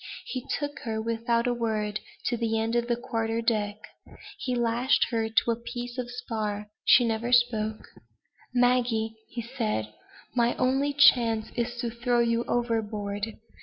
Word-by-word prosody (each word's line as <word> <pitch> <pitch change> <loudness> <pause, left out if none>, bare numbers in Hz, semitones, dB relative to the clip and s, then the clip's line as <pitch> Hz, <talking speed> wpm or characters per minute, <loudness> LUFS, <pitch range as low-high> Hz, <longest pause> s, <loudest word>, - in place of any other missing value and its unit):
He 255 - -4 0.2
took 290 -1 -4
her, 220 -2 -3
without 230 +1 0
a 245 - +2
word, 215 -3 -1 0.3
to 245 - +1
the 225 -1 0
end 225 +1 -1
of 240 0 +1
the 240 - +2
quarter 230 -2 -2
deck. 215 -3 0 0.6
He 250 -2 -1
lashed 240 +2 +2
her 225 -1 0
to 225 +1 +2
a - - +1
piece 240 +1 -6
of 245 -1 -3
spar. 215 -4 -4
She 245 - +6
never 230 +1 -1
spoke: 220 -3 +2 0.6
"Maggie," 245 -3 +2 0.2
he 235 0 -5
said, 220 - -2 0.4
"my 240 -1 +2
only 270 +3 +1
chance 235 -6 +4
is 240 0 -2
to 235 -2 -2
throw 240 +1 +1
you 235 0 +2
overboard. 215 -3 -2
235 Hz, 155 wpm, -27 LUFS, 220-245 Hz, 0.6 s, She